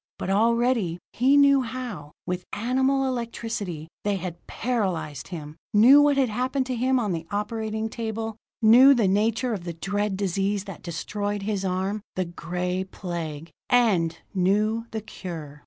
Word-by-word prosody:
But 190 - -3
already, 230 -3 +2 0.2
he 265 +4 +4
knew 280 -1 +6
how, 230 - -6
with 180 0 -3
animal 265 +4 +1
electricity, 225 -9 -4 0.2
they 205 -1 +1
had 175 -2 -6
paralyzed 190 - -2
him; 155 -3 -8 0.2
knew 255 +7 +8
what 290 -1 +4
had 270 -2 +3
happened 255 +4 -1
to 255 -1 -2
him 255 +2 +2
on 215 -5 -1
the 165 -1 -4
operating 220 +1 -2
table; 225 -1 -4 0.3
knew 255 +6 +8
the 225 -5 +2
nature 225 +5 +1
of 195 -5 -4
the 170 -1 -5
dread 205 +3 -2
disease 195 +1 0
that 195 -4 -9
destroyed 205 +4 -3
his 200 -2 -2
arm; 190 +3 -1
the 185 - 0
Gray 180 +2 -3
Plague 170 -4 -6 0.2
and 195 -10 +3 0.2
knew 210 +5 +1
the 220 - -4
cure! 160 -8 -8
205 Hz, 155 wpm, -25 LUFS, 180-235 Hz, 0.3 s, knew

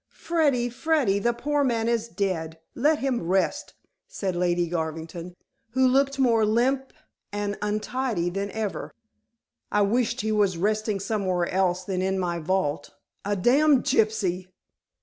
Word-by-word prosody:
"Freddy, 290 -8 +1
Freddy, 245 -5 +1
the 235 +3 +2
poor 290 +4 0
man 230 -4 0
is 235 -1 0
dead. 170 -7 -2 0.2
Let 295 +5 +2
him 265 -4 -1
rest," 190 +1 0 0.3
said 190 -3 -3
Lady 175 -1 +1
Garvington, 165 +1 -4 0.4
who 260 0 +4
looked 275 +2 +2
more 235 -4 +3
limp 255 +5 +1 0.4
and 205 0 -2
untidy 210 -2 -1
than 200 +2 -3
ever. 215 -1 -4 0.8
"I 205 - +3
wish 235 +4 +1
he 220 +1 -1
was 205 -4 +2
resting 210 +2 0
somewhere 185 -4 -1
else 185 -1 +1
than 185 -1 -2
in 190 +1 0
my 175 -2 -1
vault. 170 -3 -1 0.3
A 205 +1 0
damned 270 +7 +4
gypsy!" 195 -5 +1
210 Hz, 140 wpm, -25 LUFS, 185-245 Hz, 0.8 s, who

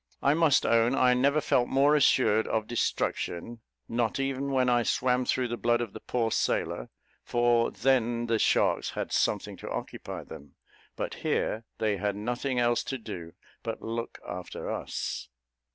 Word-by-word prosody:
I 140 - +5
must 160 -3 +4
own 115 +2 +3
I 125 -1 +4
never 140 +4 +3
felt 125 -4 +2
more 140 +3 +4
assured 125 -6 +4
of 110 -1 0
destruction, 115 -2 -2 0.3
not 115 +1 -1
even 135 0 -1
when 130 -1 +2
I 120 -1 +4
swam 125 +1 +1
through 125 -1 0
the 120 - -3
blood 120 0 +3
of 115 -4 -4
the - - -7
poor 115 -2 -1
sailor; - - -1 0.3
for 120 -1 +2
then 120 -2 +1
the 115 -1 +1
sharks - - +2
had - - -3
something - - 0
to - - -8
occupy - - -5
them, 70 -1 -12 0.4
but - - -3
here 110 +1 -1
they 105 -2 0
had 100 0 -1
nothing 120 +5 -2
else 120 -1 +2
to 135 - -3
do 85 -8 -8 0.3
but - - -4
to - - -12
look 115 +1 -4
after 90 0 -5
us. - - -4
120 Hz, 170 wpm, -28 LUFS, 110-130 Hz, 0.4 s, I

